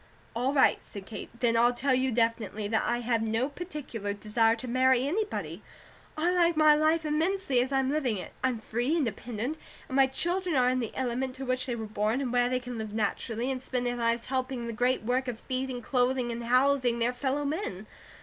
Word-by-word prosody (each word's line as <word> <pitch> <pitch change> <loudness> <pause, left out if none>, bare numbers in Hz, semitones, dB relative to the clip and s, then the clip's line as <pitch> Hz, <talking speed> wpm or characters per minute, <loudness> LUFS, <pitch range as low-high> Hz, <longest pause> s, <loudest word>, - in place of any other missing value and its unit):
"All 250 +3 +1
right," 280 -2 +4
said 200 -2 -9
Kate. 220 - -7
"Then 235 -2 +3
I'll 240 +1 +4
tell 270 +2 +1
you 260 +1 +1
definitely 230 -3 0
that 220 - +2
I 240 0 0
have 235 -1 +1
no 225 +3 0
particular 280 - -5
desire 225 +2 +2
to 245 +2 -6
marry 255 +1 +3
anybody; 415 +7 -2 0.6
I 335 +3 +2
like 345 -2 +3
my 305 -1 +7
life 310 +2 +2
immensely 310 -3 +1
as 255 +2 -2
I'm 270 0 +1
living 270 -8 0
it. 185 - -7
I'm 260 -2 +1
free, 240 +8 -1
independent, 245 +1 -3 0.3
and 260 - -5
my 270 -1 +6
children 350 +5 -1
are 250 -1 +4
in 255 0 +1
the 230 -3 -3
element 255 0 -2
to 270 - -6
which 255 0 -1
they 245 - -1
were 225 -1 -5
born, 215 +3 0
and 255 -3 -2
where 245 0 +3
they 255 0 0
can 245 -2 -6
live 215 -1 -5
naturally, 225 +3 -1
and 255 -1 -3
spend 250 -1 -2
their 245 0 0
lives 235 0 0
helping 260 -1 -2
in - - -5
the 230 - -4
great 245 +1 +1
work 255 +3 0
of 245 -3 -3
feeding, 255 -2 -3
clothing, 250 -1 +1
and 235 0 -5
housing 255 0 +3
their 235 +1 +1
fellow 270 +3 -1
men. 280 - -3
250 Hz, 215 wpm, -29 LUFS, 230-270 Hz, 0.6 s, my